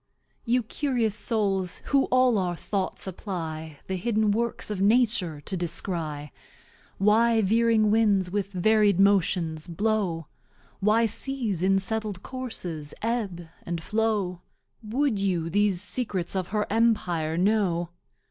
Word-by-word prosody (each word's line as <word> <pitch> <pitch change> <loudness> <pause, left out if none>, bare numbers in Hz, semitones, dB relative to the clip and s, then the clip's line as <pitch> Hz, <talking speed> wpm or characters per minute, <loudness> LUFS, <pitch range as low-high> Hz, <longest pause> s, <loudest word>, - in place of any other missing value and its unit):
You 245 +1 +2
Curious 240 -3 -1
Souls, 200 -5 -1
who 275 -1 +4
all 255 -4 +3
our 180 -2 -1
Thoughts 190 +2 -3
apply, 160 -5 -5
The 190 - -3
hidden 215 +1 +1
Works 230 0 -1
of 200 -2 -3
Nature 205 -8 +2
to 190 - -5
descry; 165 -4 -3 0.7
Why 225 +3 +4
veering 220 +1 +3
Winds 205 -5 +3
with 200 0 -2
Vari'd 205 +1 +3
Motion 180 -5 +3
blow, 185 -3 -1 0.5
Why 215 +3 +3
Seas 225 -4 -2
in 195 +1 +3
settled 210 -1 -2
Courses 180 - -5
Ebb 205 -8 -2
and 170 -1 -4
Flow; 210 -5 -1 0.4
Wou'd 235 +1 0
you 175 -4 -1
these 205 -1 +2
Secrets 205 -5 -3
of 185 -2 -1
her 210 +1 -1
Empire 180 -9 +1
know? 180 -3 +1
200 Hz, 125 wpm, -26 LUFS, 175-225 Hz, 0.7 s, who